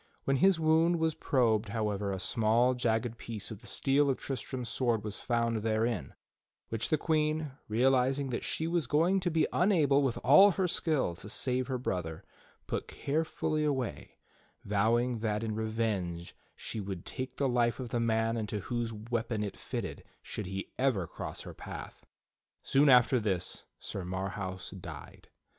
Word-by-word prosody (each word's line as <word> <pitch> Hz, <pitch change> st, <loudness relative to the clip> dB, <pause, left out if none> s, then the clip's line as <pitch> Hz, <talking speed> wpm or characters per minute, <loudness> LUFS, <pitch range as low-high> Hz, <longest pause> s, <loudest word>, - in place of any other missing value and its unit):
When 135 Hz, 0 st, +2 dB
his 190 Hz, +4 st, +4 dB
wound 160 Hz, +2 st, +4 dB
was 160 Hz, -1 st, +1 dB
probed, 115 Hz, -7 st, +1 dB
however, 105 Hz, -2 st, -1 dB
a 95 Hz, -, -2 dB
small, 115 Hz, +6 st, +2 dB
jagged 120 Hz, -1 st, -1 dB
piece 115 Hz, -1 st, -4 dB
of 105 Hz, -1 st, -8 dB
the -, -, -9 dB
steel 140 Hz, +1 st, +2 dB
of 135 Hz, -, +1 dB
Tristram's 130 Hz, -1 st, -4 dB
sword 120 Hz, -3 st, 0 dB
was 105 Hz, -1 st, -4 dB
found 115 Hz, -1 st, +1 dB
therein, 110 Hz, -, -1 dB, 0.5 s
which 115 Hz, 0 st, -2 dB
the 155 Hz, -, +3 dB
Queen, 155 Hz, -1 st, 0 dB, 0.2 s
real 120 Hz, +5 st, +3 dB
izing 135 Hz, +1 st, +1 dB
that 120 Hz, -, -2 dB
she 160 Hz, -, -1 dB
was 165 Hz, -4 st, 0 dB
going 170 Hz, +8 st, +3 dB
to 180 Hz, -1 st, 0 dB
be 160 Hz, -2 st, +2 dB
unable, 155 Hz, -8 st, +4 dB
with 135 Hz, -4 st, 0 dB
all 150 Hz, +10 st, +8 dB
her 185 Hz, 0 st, +1 dB
skill, 155 Hz, -, 0 dB
to 105 Hz, -, -8 dB
save 125 Hz, +2 st, 0 dB
her 130 Hz, -2 st, -1 dB
brother, 90 Hz, -9 st, -3 dB, 0.4 s
put -, -, -3 dB
carefully 155 Hz, +1 st, -1 dB
away, 135 Hz, -5 st, -2 dB, 0.5 s
vowing 115 Hz, +4 st, +2 dB
that 105 Hz, -1 st, -1 dB
in 110 Hz, -1 st, -2 dB
revenge 105 Hz, -6 st, -2 dB, 0.2 s
she 110 Hz, -, -5 dB
would 95 Hz, -4 st, -5 dB
take 130 Hz, -1 st, -5 dB
the 140 Hz, -, +1 dB
life 120 Hz, -1 st, +1 dB
of 125 Hz, -2 st, -5 dB
the 120 Hz, -, -1 dB
man 115 Hz, 0 st, +1 dB
into 105 Hz, -2 st, -3 dB
whose 120 Hz, 0 st, -2 dB
weapon 110 Hz, 0 st, -2 dB
it 100 Hz, -, -3 dB
fltted -, -, -5 dB, 0.2 s
should 105 Hz, -, -5 dB
he 95 Hz, +1 st, -5 dB
ever 125 Hz, -9 st, +2 dB
cross -, -, -7 dB
her -, -, -8 dB
path. -, -, -9 dB, 0.6 s
Soon 140 Hz, +2 st, +4 dB
after 125 Hz, -1 st, +6 dB
tliis 95 Hz, -4 st, -1 dB
Sir 95 Hz, -, -5 dB
Marhaus 95 Hz, 0 st, -4 dB
died. -, -, -10 dB
120 Hz, 165 wpm, -31 LUFS, 110-140 Hz, 0.6 s, all